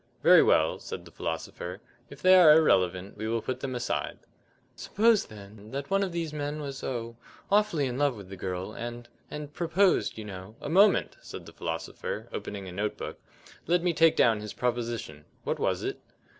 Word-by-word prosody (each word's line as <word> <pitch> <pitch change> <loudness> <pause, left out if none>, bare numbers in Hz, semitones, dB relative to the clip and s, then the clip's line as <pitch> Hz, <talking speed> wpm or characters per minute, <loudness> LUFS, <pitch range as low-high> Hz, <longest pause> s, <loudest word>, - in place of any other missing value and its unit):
"Very - - +8
well," 80 0 +3
said - - -7
the - - -14
philosopher, 85 +3 -5 0.3
"if 140 - -13
they 185 0 +7
are 170 -5 +9
irrelevant 95 - +2
we 110 +1 -4
will 115 +1 0
put 130 -1 -3
them 130 -1 -4
aside." 120 - -2 0.6
"Suppose, 220 +1 +2
then, 105 0 -12
that 140 +7 -5
one 195 0 +3
of 195 -2 -1
these 165 -3 -3
men 145 0 -3
was, 140 -2 -6
oh, 115 -2 -4 0.3
awfully 200 -8 +3
in 125 0 -3
love 145 -3 +2
with 100 -3 -10
the 95 - -8
girl, 95 +2 -4
and 120 +1 -7 0.2
and 150 -1 -7
proposed, 180 - +2
you 110 - -6
know 95 +1 -9
" - - -30
"A - - -6
moment!" 195 +5 +4
said - - -9
the - - -12
philosopher, 80 0 -5
opening 100 -2 -5
a - - -7
note 105 +3 -3
book. - - -7 0.5
"Let 175 0 +2
me 175 -1 +2
take 165 0 +5
down 115 -3 +4
his 105 0 -7
proposition. 115 -11 -3 0.2
What - - -2
was - - 0
it?" - - -3
120 Hz, 195 wpm, -28 LUFS, 100-155 Hz, 0.6 s, are